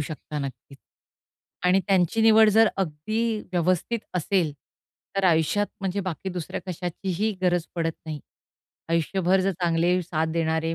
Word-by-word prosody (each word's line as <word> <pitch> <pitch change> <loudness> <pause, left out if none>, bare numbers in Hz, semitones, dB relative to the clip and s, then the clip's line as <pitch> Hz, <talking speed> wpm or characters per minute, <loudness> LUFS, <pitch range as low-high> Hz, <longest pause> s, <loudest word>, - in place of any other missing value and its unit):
शकता, 150 0 -5
नक्कीच. 135 0 -7 0.9
आणि 180 +2 +4
त्यांची 190 +2 +2
निवड 220 0 +7
जर 220 +1 +5
अगदी 215 +7 -1
व्यवस्थित 180 +6 +1 0.2
असेल, 180 -2 +1 0.6
तर 195 - +1
आयुष्यात 175 +4 +3
म्हणजे 195 +1 -1
बाकी 185 -1 -4
दुसऱ्या 180 -3 -5
कशाचीही 185 +3 -2
गरज 175 -1 +2
पडत 165 -1 -1
नाही. 155 -2 -5 0.7
आयुष्यभर 180 +3 +2
जर 195 +1 +1
चांगले, 175 +1 +2
साथ 160 -2 -1
देणारे 160 0 0
180 Hz, 130 wpm, -25 LUFS, 160-195 Hz, 0.9 s, निवड